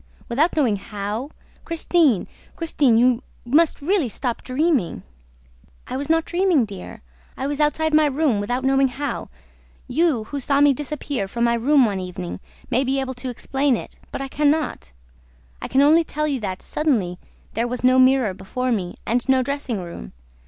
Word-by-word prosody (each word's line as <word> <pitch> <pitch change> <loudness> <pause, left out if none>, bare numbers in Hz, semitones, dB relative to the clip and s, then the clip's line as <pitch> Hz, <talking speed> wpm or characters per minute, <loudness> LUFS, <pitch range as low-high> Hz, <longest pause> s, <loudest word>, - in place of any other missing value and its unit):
Without 290 +9 +2
knowing 240 -9 +2
how? 210 +5 -5 0.3
Christine, 325 - +2 0.3
Christine, 290 -8 +2
you 245 0 +3 0.2
must 295 +4 +2
really 345 - +1
stop 245 +1 -2
dreaming!" 260 - 0 0.8
"I - - -5
was 280 +3 -4
not 325 0 +3
dreaming, 350 -7 +2
dear, 195 - -10 0.3
I 265 - -3
was 285 +1 -2
outside 310 +1 +1
my 305 0 +5
room 280 -6 +1
without 245 +5 -2
knowing 270 0 +3
how. 280 +3 -4 0.6
You, 275 -3 +1
who 285 +6 -5
saw 275 +1 +1
me 290 -1 +6
disappear 290 -5 -3
from 235 +4 -2
my 235 0 +3
room 260 +3 +4
one 200 -3 -1
evening, 90 - -6 0.3
may 255 +3 +3
be 270 +1 0
able 265 -1 -3
to 255 +1 -6
explain 270 +1 0
it; - - -10
but - - -4
I - - -4
can 290 +2 +2
not. 305 - -1 0.7
I - - -4
can 270 - +3
only 315 +3 +5
tell 305 -1 -2
you 280 -3 -1
that, 190 -4 -5
suddenly, 215 - 0 0.3
there 230 +2 0
was 250 +1 -4
no 255 +1 +5
mirror 255 -5 +4
before 250 +7 -3
me 185 -6 -2
and 245 +3 -1
no 260 -1 +4
dressing 270 -6 -3
room. 170 - -9
260 Hz, 175 wpm, -22 LUFS, 230-295 Hz, 0.8 s, me